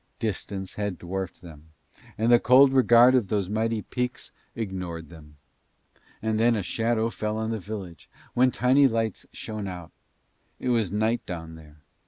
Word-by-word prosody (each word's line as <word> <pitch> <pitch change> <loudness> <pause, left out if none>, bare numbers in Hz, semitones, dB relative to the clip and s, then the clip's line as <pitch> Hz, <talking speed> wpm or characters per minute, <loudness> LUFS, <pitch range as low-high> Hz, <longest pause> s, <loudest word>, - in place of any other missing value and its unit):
Distance 100 -3 -4
had 105 -3 -3
dwarfed 95 +1 -5
them, 80 -2 -14 0.4
and 115 +2 +2
the 120 - +7
cold 130 +3 +6
regard 125 -1 +6
of 125 -6 +2
those 100 -1 -1
mighty 110 0 -1
peaks 125 0 -4 0.2
ignored 90 -7 -5
them. 75 -3 -15 0.9
And 110 -1 0
then 115 +1 +4
a 105 - -2
shadow 115 +3 0
fell 110 -1 -3
on 110 0 -2
the 110 - -2
village, 95 - -8 0.3
then 125 +1 +5
tiny 130 +4 +4
lights 115 -3 -2
shone 110 -2 -6
out. 90 -3 -8 0.7
It 125 - -3
was 115 -6 +1
night 110 +3 0
down 80 -2 -6
there. 75 -2 -15
110 Hz, 160 wpm, -26 LUFS, 90-115 Hz, 0.9 s, the